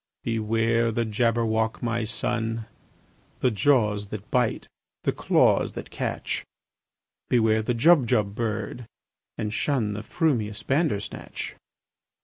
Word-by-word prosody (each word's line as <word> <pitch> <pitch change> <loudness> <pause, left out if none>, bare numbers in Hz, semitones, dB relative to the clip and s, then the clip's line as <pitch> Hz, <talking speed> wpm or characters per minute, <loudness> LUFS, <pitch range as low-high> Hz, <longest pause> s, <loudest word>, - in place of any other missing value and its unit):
"Beware 115 +1 +1
the 115 +1 0
Jabberwock, 110 0 +1
my 115 -1 0
son! 115 +1 -2 0.8
The 125 - +3
jaws 105 -2 +2
that 105 0 -8
bite, 125 -3 +1 0.4
the - - +2
claws - - +3
that - - -7
catch! - - -3 0.9
Beware 110 -2 +3
the 120 +2 -1
Jubjub 120 - +4
bird, 110 +1 -3 0.5
and 105 -1 -2
shun 115 -5 0
The 105 - -4
frumious 115 - -1
Bandersnatch!" 135 -8 -2
115 Hz, 110 wpm, -26 LUFS, 105-120 Hz, 0.9 s, Jubjub